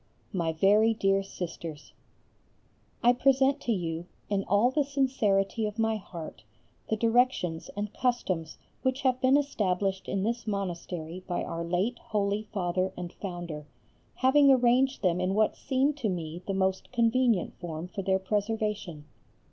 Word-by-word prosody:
MY 170 -4 0
VERY 210 +7 +4
DEAR 195 -2 +2
SISTERS, 170 -5 -7 1.1
I 240 +1 +6
present 270 +2 +3
to 240 - -1
you, 170 -4 -2 0.2
in 195 -1 +1
all 205 +6 +3
the 295 +2 +2
sincerity 230 -7 +1
of 210 +1 -7
my 225 -1 +1
heart, 170 -5 -9 0.5
the 220 - +2
directions 225 -7 +1
and 205 0 -3
customs 185 -11 -1 0.2
which 260 +1 0
have 255 -1 +1
been 265 +1 +5
established 195 -8 -1
in 195 -1 -1
this 230 +2 -2
monastery 180 -3 -4
by 175 - -1
our 165 0 -4
late 185 +8 -1
holy 205 0 -1
Father 185 -1 0
and 175 -1 -6
Founder, 175 -6 -6 0.5
having 275 +2 +5
arranged 255 +1 +3
them 180 -1 +2
in 185 +1 0
what 215 0 +2
seemed 275 +2 0
to 235 -7 -1
me 170 -2 -4
the 195 - -1
most 190 0 0
convenient 235 -4 +2
form 170 -1 -5
for 195 - -5
their 190 0 +2
preservation. 205 -5 -2
200 Hz, 150 wpm, -29 LUFS, 180-240 Hz, 1.1 s, I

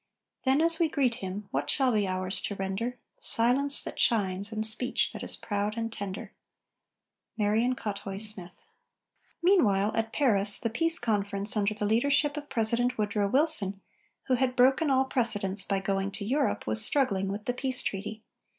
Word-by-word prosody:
Then, 265 +3 +1
as 330 0 +1
we 330 -2 0
greet 270 -5 -1
him, 195 +2 -8
what - - -4
shall 265 -3 0
be 210 -3 -1
ours 185 +1 -3
to 200 - -5
render? 195 +6 -5 0.2
Silence 265 +5 +4
that - - -8
shines, 200 -2 -1
and 220 0 -1
speech 220 +3 +1
that - - -9
is - - -5
proud 205 0 -5
and 225 0 -5
tender! 200 -3 -8 1.1
MARION 220 +4 -1
COUTHOUY 200 -3 -7
SMITH. 200 -4 -1 0.8
Meanwhile, 215 - +1
at 225 0 -3
Paris, 205 -8 +6
the 230 - -3
Peace 330 +7 +7
Conference, 205 - 0
under 210 0 -2
the 210 - -4
leadership 285 +7 0
of 295 -1 -9
President 245 +1 +1
Woodrow 210 -1 -2
Wilson, 255 -8 +2 0.4
who 260 - -3
had 255 0 -1
broken 265 +4 +1
all 265 0 +1
precedents 205 -7 +2
by 195 -1 -3
going 195 0 -3
to 200 0 -8
Europe, 275 +5 -2
was 110 0 +2
struggling 195 -9 +1
with 205 +1 -8
the 245 - -3
peace 255 0 -3
treaty. 215 +3 -7
220 Hz, 170 wpm, -26 LUFS, 200-260 Hz, 1.1 s, Peace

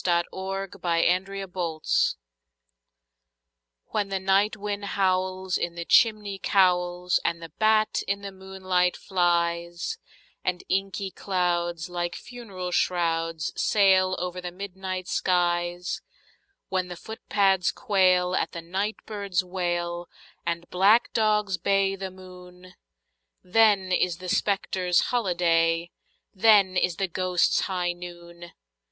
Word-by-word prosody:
THE 170 -1 +2
GHOSTS' 195 0 -5
HIGH 175 +1 +3 0.3
NOON 175 -4 -4 2.1
WHEN 205 -2 -1
the 195 -1 -1
night 195 +3 +2
wind 205 0 -4
howls 185 -1 0
in 170 0 -3
the 170 0 -5
chimney 210 -3 +3
cowls, 180 -2 +2
and 170 0 0
the 165 -2 -10
bat 215 0 +3
in 200 +1 -2
the 200 - -5
moonlight 190 -1 -1
flies, 170 - -1 0.4
And 180 -1 -2
inky 195 0 -1
clouds, 175 -4 -1
like 175 -1 -3
funeral 200 -7 -7
shrouds, 165 -3 0
sail 190 -2 +3
over 180 0 -4
the 180 - -4
midnight 185 -1 -6
skies— 175 -1 0 0.7
When 185 -1 -1
the 175 - -7
footpads 195 -2 0
quail 185 -6 +2
at - - -1
the 170 - -5
night 195 +5 -2
bird's 200 -4 -2
wail, 175 -1 -3 0.4
and 170 0 -2
black 200 +6 +4
dogs 210 -3 +2
bay 195 -1 +2
the 195 0 -5
moon, 180 -1 -14 0.7
Then 200 -1 +3
is 180 -2 +1
the 180 0 -7
spectres' 185 -3 +1
holiday—then 180 +1 +2
is 180 -2 +1
the 195 - -1
ghosts' 180 -1 +1
high 180 -2 -1
noon! 175 -1 -11
185 Hz, 115 wpm, -26 LUFS, 175-195 Hz, 2.1 s, black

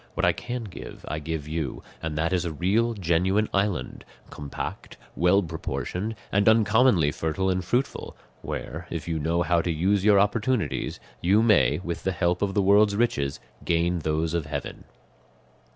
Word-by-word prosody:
What - - +1
I - - +5
can 120 0 -5
give 100 -5 -10
I 75 +2 -3
give 75 -1 -4
you, 80 -4 -4 0.2
and 80 -2 -3
that 85 +4 0
is 90 - +1
a 85 - -3
real, 105 +9 +1
genuine 95 +3 +1
island, 100 -9 -1 0.3
compact, 70 -1 -6 0.2
well 90 +5 +3
proportioned, 90 +5 -4 0.2
and 100 +2 +4
uncommonly 110 - +4
fertile 95 +6 -1
and 90 0 -1
fruitful, 125 +9 -2 0.2
where, 85 +3 -6
if 85 -1 -5
you 80 -1 -1
know 85 +3 +1
how 85 0 +2
to 85 - -3
use 95 +5 +1
your 105 -1 +6
opportunities, 105 - 0 0.2
you 100 +6 +4
may, 75 - +4
with 85 -1 -4
the 95 - 0
help 90 0 0
of 100 -1 -1
the 100 - +3
world's 100 +1 +5
riches, 100 -12 0 0.2
gain 85 +1 +1
those 80 +1 -1
of 85 -4 -1
heaven." 70 -1 -5
90 Hz, 170 wpm, -26 LUFS, 80-105 Hz, 0.3 s, your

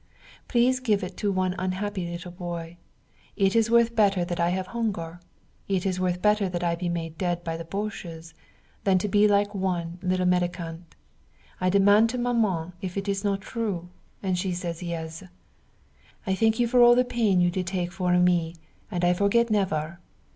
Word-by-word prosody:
Please 255 +1 +3
give 215 -6 +1
it 180 0 -6
to 205 - 0
one 185 -1 0
unhappy 185 0 -2
little 175 +1 -7
boy. 175 -2 -6 0.6
It 195 0 +2
is 225 0 +3
worth 235 0 +4
better 195 -5 +3
that 175 0 -4
I 170 0 +2
have 185 +1 -1
hunger, 185 -7 -3 0.5
it 190 -2 0
is 185 -1 -1
worth 180 -1 -1
better 210 -2 +3
that 175 -1 -3
I 170 -1 +1
be 175 +1 -3
made 165 -2 -4
dead 175 -2 -1
by 165 -1 -3
the 165 0 -6
boches, 170 -4 -6 0.5
than 190 -2 +3
to 185 - -1
be 210 +1 +4
like 205 0 +2
one 180 -3 -2
little 185 0 0
mendicant. 175 -2 -2 0.6
I 185 - +1
demand 205 +3 +5
to 250 - -3
Maman 215 -9 0
if 185 0 -5
it 195 +1 -3
is 200 0 -1
not 200 -1 0
true, 195 -6 -4 0.3
and 185 -2 0
she 185 0 -1
say 175 -1 -3
yes. 165 -2 -5 1.0
I 190 - 0
thank 220 +3 +2
you 240 - +3
for 245 +1 +4
all 240 0 +8
the 250 +1 +3
pain 220 -6 +1
you 175 0 +3
did 180 0 -3
take 180 -1 -2
for 180 -1 +1
me 175 -2 +2 0.3
and 175 -4 -1
I 175 - +4
forget 210 +5 +2
never. 170 -5 0
185 Hz, 190 wpm, -26 LUFS, 175-205 Hz, 1.0 s, all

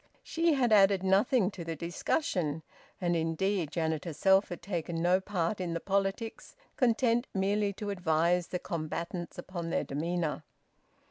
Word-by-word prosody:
She 330 -1 +1
had 245 -5 +3
added 195 -2 +5
nothing 195 +2 +3
to 185 -3 -7
the 165 0 -4
discussion. 170 - -1 0.4
And 175 -2 +1
indeed 165 +1 0
Janet 160 -2 -1
herself 190 +4 +3
had 175 - -7
taken 170 -3 -3
no 175 +2 +3
part 190 0 -2
in 170 -2 -2
the - - -1
politics, 195 +4 -2 0.2
content 240 -1 +2
merely 200 +1 +1
to 205 +1 -4
advise 175 -1 +1
the 180 - -2
combatants 170 +1 -4
upon 175 -1 -5
their - - 0
demeanour. 160 +2 -2
180 Hz, 145 wpm, -30 LUFS, 165-200 Hz, 0.4 s, added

